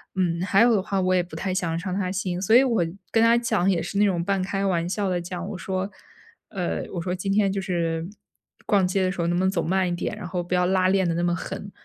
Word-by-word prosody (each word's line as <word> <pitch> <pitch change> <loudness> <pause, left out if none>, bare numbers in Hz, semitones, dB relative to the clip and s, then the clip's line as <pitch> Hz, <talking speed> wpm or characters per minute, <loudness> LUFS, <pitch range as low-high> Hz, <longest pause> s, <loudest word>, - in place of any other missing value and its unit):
嗯， 170 -3 0
还 195 +3 +3
有 235 -1 +5
的 195 - +2
话 195 -1 -1
我 185 0 +2
也 180 - +2
不 175 - -11
太 190 - -2
想 175 -3 -1
要 165 - -1
伤 185 +1 -3
他 185 -2 -1
心。 185 -2 -2
所 220 +4 +4
以 255 - +9
我 230 -10 +1 0.3
跟 225 0 +4
他 230 +1 +5
讲 220 -6 +1
也 170 -3 0
是 180 +4 -4
那 210 - +5
种 175 -4 +1
半 195 0 0
开 195 +1 -2
玩 170 -3 0
笑 200 -1 -1
地 175 -1 -1
讲， 180 +1 -6
我 200 - -5
说， 190 +1 -3 0.6
呃， 180 -3 -3
我 175 - -3
说： 180 +1 -2
“今 195 +2 -3
天 200 -1 +3
就 195 0 -2
是 170 -3 -2 0.6
逛 200 -4 +3
街 190 +1 0
的 185 - +1
时 180 - -4
候 170 - 0
能 175 0 +1
不 185 - +1
能 190 - +3
走 180 -3 0
慢 185 +2 +1
一 175 - -1
点， 205 - -3
然 180 - -6
后 175 +1 -3
不 175 - -5
要 180 0 +2
拉 185 0 +2
练 190 -2 +2
得 165 - +1
那 170 - -1
么 175 0 +1
狠。” 195 +2 -6
185 Hz, 310 characters per minute, -24 LUFS, 175-195 Hz, 0.6 s, 以